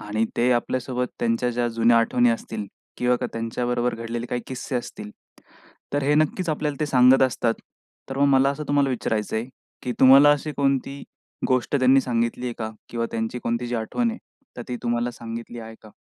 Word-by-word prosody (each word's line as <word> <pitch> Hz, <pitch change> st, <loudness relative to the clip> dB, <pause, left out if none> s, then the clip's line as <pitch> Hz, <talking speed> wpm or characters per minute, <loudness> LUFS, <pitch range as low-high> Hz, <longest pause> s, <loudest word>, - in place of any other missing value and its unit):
आणि 110 Hz, +2 st, -1 dB
ते 120 Hz, +2 st, +3 dB
आपल्यासोबत 125 Hz, +1 st, -1 dB
त्यांच्या 120 Hz, +1 st, 0 dB
ज्या 120 Hz, 0 st, 0 dB
जुन्या 115 Hz, 0 st, +3 dB
आठवणी 120 Hz, +1 st, +3 dB
असतील. 110 Hz, -2 st, -4 dB, 0.3 s
किंवा 125 Hz, 0 st, +2 dB, 0.2 s
त्यांच्याबरोबर 120 Hz, +1 st, -1 dB
घडलेले 115 Hz, +1 st, -5 dB
काही 125 Hz, -, -2 dB
किस्से 130 Hz, 0 st, -4 dB
असतील. 105 Hz, -3 st, -6 dB, 0.8 s
तर 145 Hz, 0 st, 0 dB
हे 145 Hz, +2 st, +2 dB
नक्कीच 155 Hz, +4 st, +1 dB
आपल्याला 150 Hz, -2 st, -2 dB
ते 150 Hz, -, +1 dB
सांगत 130 Hz, 0 st, +5 dB
असतात. 120 Hz, -2 st, +1 dB, 0.6 s
तर 135 Hz, -, -4 dB
मग 140 Hz, -, +4 dB
मला 135 Hz, +1 st, +4 dB
असं 150 Hz, +2 st, -5 dB
तुम्हाला 145 Hz, -1 st, +2 dB
विचारायचंय, 110 Hz, -2 st, -2 dB, 0.4 s
की 125 Hz, -, -2 dB
तुम्हाला 135 Hz, +3 st, +8 dB
अशी 150 Hz, +1 st, -3 dB
कोणती 140 Hz, 0 st, 0 dB, 0.5 s
गोष्ट 130 Hz, +2 st, +1 dB
त्यांनी 130 Hz, 0 st, +5 dB
सांगितली 120 Hz, 0 st, -1 dB
आहे 120 Hz, -, -3 dB
का? 110 Hz, -1 st, -3 dB, 0.2 s
किंवा 115 Hz, -1 st, -2 dB
त्यांची 115 Hz, +1 st, -2 dB
कोणती 120 Hz, 0 st, -2 dB
जी 120 Hz, -, -3 dB
आठवण 230 Hz, -, -1 dB
आहे 230 Hz, -, -7 dB, 0.4 s
तर 120 Hz, -, -5 dB
ती 125 Hz, -, -3 dB
तुम्हाला 120 Hz, 0 st, 0 dB
सांगितली 115 Hz, 0 st, -8 dB
आहे 110 Hz, 0 st, -9 dB
का? 110 Hz, -, -14 dB
125 Hz, 180 wpm, -24 LUFS, 115-135 Hz, 0.8 s, तुम्हाला